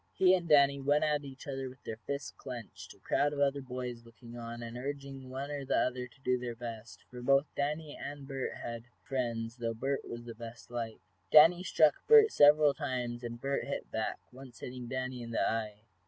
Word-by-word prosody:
He 185 -1 +6
and 175 -3 0
Danny 140 -2 +6
went 145 +2 +2
at 150 -1 +1
each 135 -1 -10
other 135 -1 -3
with 130 0 -16
their 110 - -6
fists 140 0 -3
clenched, 125 -5 -9
a - - -24
crowd 145 +1 +1
of 145 - -4
other 140 0 +2
boys 125 -2 -5
looking 115 0 -13
on, 120 0 -6
and 115 0 -7
urging 135 0 -6
one 135 +3 -5
or 145 -1 -3
the 130 - +1
other 125 0 0
to 135 - -24
do 125 -1 +1
their 120 -1 -4
best, 115 -1 -8
for 125 -1 -8
both 135 +3 +3
Danny 150 +1 -2
and 140 -1 -7
Bert 135 -2 -3
had 115 0 -6 0.2
friends, 120 -3 -2
though 115 -1 -2
Bert 135 +4 -1
was 120 0 -7
the 120 - -7
best 115 +1 -10
liked. 115 -2 -4 0.3
Danny 165 +4 +8
struck 155 -5 +4
Bert 440 -1 +8
several 145 0 +6
times, 120 -2 -3
and 120 0 -5
Bert 140 +2 -1
hit - - -5
back, - - -2
once 130 0 -13
hitting 125 -1 -6
Danny 130 0 -3
in 115 - -7
the 115 - +1
eye. 105 -2 -2
130 Hz, 210 wpm, -32 LUFS, 120-140 Hz, 0.3 s, Danny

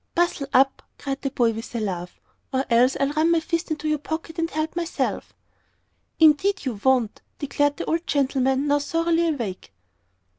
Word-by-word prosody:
"Bustle 340 -5 +1
up," 270 +1 +3 0.2
cried 275 -1 -4
the 275 - -1
boy, 240 -4 +2
with 225 +2 -7
a - - 0
laugh, 180 -4 -4 0.3
"or 265 +1 0
else 245 +3 +4
I'll 275 +1 +1
run 310 +2 +2
my 335 -1 +4
fist 335 +1 -2
in 315 - -1
your 305 -1 +1
pocket 320 +2 -5
and 330 0 0
help 310 0 -3
myself." 345 -1 -2 0.9
"Indeed, 320 +4 +4
you 235 -6 -3
won't," 255 -5 +2 0.2
declared 290 0 0
the - - -4
old 330 +1 -1
gentleman, 270 -1 +1
now 290 0 +2
thoroughly 330 +3 +1
awake. 230 - -4
285 Hz, 175 wpm, -24 LUFS, 260-325 Hz, 0.9 s, else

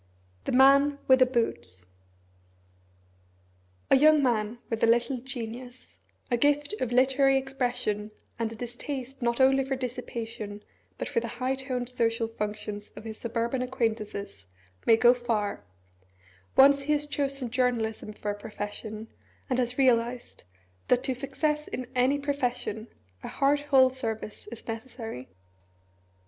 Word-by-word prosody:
THE - - -1
MAN 275 +2 +6
WITH 260 0 +6
THE 255 - +6
BOOTS 160 - -2 2.1
A - - +9
YOUNG 300 +1 +6
man 225 -2 0
with 225 -1 -3
a - - +6
little 240 +3 +2
genius, 245 0 -8 0.3
a 240 - +3
gift 290 - +2
of 250 - -1
literary 270 +2 +4
expression, 250 -6 -2 0.3
and 225 -1 -1
a - - -7
distaste 250 +3 -6
not 235 +1 0
only 270 +1 +5
for 270 0 -2
dissipation, 230 -4 -5 0.3
but - - -3
for - - 0
the - - -5
high 255 +1 -2
toned 260 -2 -3
social 230 -2 0
functions 210 -1 -5
of - - -9
his 220 -1 -7
suburban 235 +2 -1
acquaintances, 220 - -3 0.4
may 225 - +7
go 240 +2 +6
far 225 - -2 0.9
once 280 +1 +7
he 300 +2 +1
has 295 0 +1
chosen 275 -4 -1
journalism 235 -4 0
for 210 0 -4
a 205 - -7
profession, 215 +1 -6 0.4
and 255 - +2
has 245 0 0
realised 245 - +1 0.4
that 250 0 +3
to 265 -1 0
success 285 +4 -1
in 255 - -4
any 255 +2 +3
profession 250 -6 -2 0.3
a - - -7
heart 280 +1 +2
whole 270 -3 +4
service 225 -5 -5
is 235 - -10
necessary. 225 - -6
245 Hz, 140 wpm, -28 LUFS, 225-270 Hz, 2.1 s, A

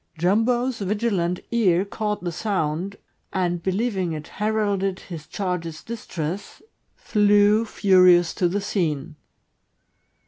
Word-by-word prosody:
Jumbo's 225 +8 +1
vigilant 195 -3 -1
ear 195 -6 +3
caught 210 -1 -3
the 175 - -2
sound, 180 0 -2 0.4
and 175 -2 -1
believing 190 -2 -1
it 155 -1 -7
heralded 205 -3 0
his 160 -4 -9
charge's 175 -5 -4
distress, 190 -5 -5 0.4
flew, 210 - +3
furious, 180 -5 +4
to 180 - +1
the 200 +4 -1
scene. 165 -6 -2
190 Hz, 105 wpm, -23 LUFS, 175-210 Hz, 0.4 s, furious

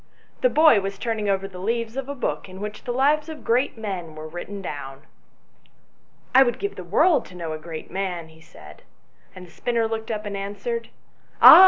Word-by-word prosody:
The - - +5
boy 310 - +6
was 195 0 -4
turning 220 -2 -1
over 195 0 +1
the 185 -2 -10
leaves 230 +3 -1
of 270 0 -4
a 285 - -3
book 245 - -2
in 185 +1 -10
which 210 +1 -6
the 245 - -1
lives 295 +5 +2
of 315 -1 -8
great 245 +2 +1
men 185 -7 -5
were 155 0 -7
written 175 +5 -6
down. 140 -6 -6 0.6
" - - -37
I 260 - +8
would 240 -3 +3
give 405 0 -3
the - - -7
world 355 -5 +4
to 180 - -13
know 165 -3 -4
a 155 - -5
great 160 0 -8
man," 180 -3 -3
he 160 0 -18
said, 75 - -14 0.5
and 185 0 -9
the 170 - -17
spinner 230 +3 0
looked 220 0 -4
up 215 -1 -3
and 205 -1 -4
answered 205 - -4 0.5
"Ah! - - +12
205 Hz, 210 wpm, -24 LUFS, 175-245 Hz, 0.6 s, Ah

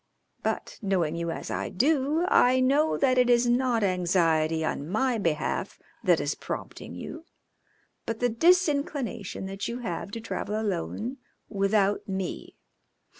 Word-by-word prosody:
But - - -3
knowing 180 -6 0
you 170 0 -2
as 165 - -5
I - - -2
do, 295 - +2
I 255 -7 +5
know 280 +5 +3
that 255 -2 +3
it 250 -1 +4
is 240 0 +4
not 240 -2 +2
anxiety 165 -4 +2
on 150 -1 -3
my 240 +4 +1
behalf 165 -5 -1 0.3
that - - +4
is - - -1
prompting - - -7
you, 325 - -8 0.8
but 230 -1 -3
the 245 - +3
disinclination 280 - +1
that 195 +1 -4
you 235 - -4
have 230 - -4
to 230 - -3
travel 215 -1 -3
alone 220 +5 -3 0.3
without 200 0 +1
me. 190 -2 -4
225 Hz, 140 wpm, -27 LUFS, 190-255 Hz, 0.8 s, I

